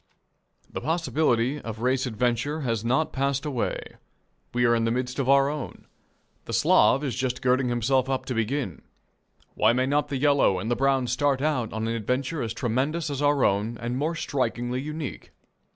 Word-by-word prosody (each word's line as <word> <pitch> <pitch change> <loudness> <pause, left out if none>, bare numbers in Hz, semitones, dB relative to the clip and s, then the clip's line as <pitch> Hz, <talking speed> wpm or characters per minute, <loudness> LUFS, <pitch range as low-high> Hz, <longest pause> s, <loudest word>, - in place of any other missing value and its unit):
The - - -6
possibility 150 -5 +1
of 110 -1 -7
race 130 +1 +1
adventure 125 +6 -1
has 115 -5 -1
not 130 +7 +1
passed 140 +1 -1
away. 135 -6 -3 0.5
We 120 0 +1
are 120 - +4
in 115 - +1
the - - +1
midst 125 +3 -2
of 135 -1 0
our 140 0 +5
own. 145 -2 -5 0.6
The - - -6
Slav 135 - +4
is 135 -4 -2
just 125 0 -2
girding 125 0 +2
himself 130 +2 +1
up 135 -1 -1
to 130 - -3
begin. 115 - -2 0.7
Why 110 +2 +3
may 130 +1 +1
not 145 +2 +1
the 140 -2 -3
yellow 140 -8 +3
and 105 +6 -3
the - - +3
brown 135 0 +2
start 135 +2 +1
out 135 -6 0
on 110 +1 -3
an 115 - -1
adventure 125 +7 -2
as 115 - -2
tremendous 140 +7 -1
as 140 0 -3
our 145 -2 +3
own 105 +4 0
and 120 +2 -3
more 155 +5 -1
strikingly 125 -4 -2
unique? 150 0 -6
130 Hz, 185 wpm, -26 LUFS, 120-140 Hz, 0.7 s, our